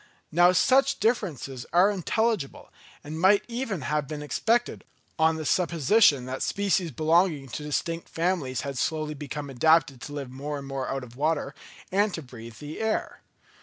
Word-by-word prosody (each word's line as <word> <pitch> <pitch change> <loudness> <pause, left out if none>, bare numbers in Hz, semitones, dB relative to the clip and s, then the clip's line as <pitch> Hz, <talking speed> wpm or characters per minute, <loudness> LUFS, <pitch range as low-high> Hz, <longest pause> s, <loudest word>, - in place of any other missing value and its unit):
Now 175 +2 +6
such 270 +8 +3
differences 165 - -1
are 180 +4 +5
intelligible, 205 -3 -2 0.3
and 155 +2 -6
might 200 +2 +5
even 235 - -3
have 150 +2 -1
been 150 0 -6
expected, 230 +10 0 0.4
on 160 0 +4
the 160 -1 -5
supposition 170 - +3
that 130 +1 -5
species 195 -3 0
belonging 155 -1 +1
to 135 - -5
distinct 165 +3 -3
families 165 -7 -1
had 140 -3 -4
slowly 155 -1 -1
become 145 0 -6
adapted 140 -1 +3
to 145 - -8
live 140 -3 -5
more 145 +3 -5
and 140 - -7
more 135 -1 -4
out 135 -1 -3
of 120 -1 -12
water, 150 +3 -1 0.4
and 205 +2 +2
to 160 - -6
breathe 115 -3 -11
the 150 +6 -8
air. 220 0 -2
155 Hz, 165 wpm, -26 LUFS, 140-185 Hz, 0.4 s, Now